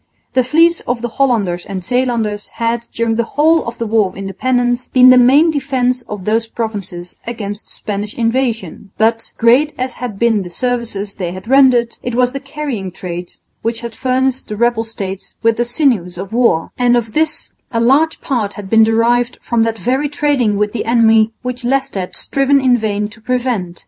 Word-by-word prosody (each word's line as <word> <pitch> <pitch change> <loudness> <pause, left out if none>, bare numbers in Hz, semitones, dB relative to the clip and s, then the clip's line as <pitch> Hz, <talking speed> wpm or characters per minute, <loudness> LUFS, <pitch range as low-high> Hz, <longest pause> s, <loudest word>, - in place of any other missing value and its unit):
The 255 - +3
fleets 330 +6 +3
of 240 -1 -2
the 240 - -1
Hollanders 205 -10 +1
and 190 -2 -6
Zeelanders 230 -3 -1
had 230 0 -1
during 230 -1 -1
the 235 - +2
whole 320 +2 +4
of 235 +1 -5
the 230 - -3
war 215 -2 +2
of 185 - -15
independence 245 +5 -1
been 255 0 +6
the 255 - +7
main 280 +7 +5
defence 260 -3 0
of 205 -3 -6
those 225 +1 +1
provinces 200 -6 -6
against 210 -3 -6
Spanish 210 0 -5
invasion; 230 -6 -1
but, 225 +1 +1
great 255 +6 +3
as 255 0 -3
had 240 -5 -4
been 225 -1 +2
the 180 - -7
services 225 -1 -3
they 175 -2 -4
had 185 +3 -9
rendered, 255 -3 +4
it 245 -1 -4
was 250 0 +2
the 275 - -4
carrying 265 -11 -5
trade 175 -1 -7 0.3
which 230 0 -2
had 235 -1 -6
furnished 260 +1 -1
the 210 - -5
rebel 235 0 +1
states 195 -4 -7
with 230 0 +3
the 240 - +1
sinews 240 - 0
of 195 +4 -7
war, 230 -9 +2
and 245 -1 +4
of 225 -2 -3
this 315 0 0 0.2
a 230 - 0
large 280 +7 +2
part 225 -8 -1
had 200 -2 -9
been 225 0 +6
derived 235 +2 +2
from 235 -2 -1
that 225 0 0
very 265 +6 0
trading 280 -8 +1
with 210 0 0
the 240 - -3
enemy 225 -1 +4
which 250 0 -4
Leicester 265 -4 0
had 180 - -5
striven 275 0 +2
in 255 -2 +3
vain 210 -2 -1
to 215 +1 -15
prevent. 240 -8 -2
235 Hz, 190 wpm, -16 LUFS, 210-255 Hz, 0.3 s, the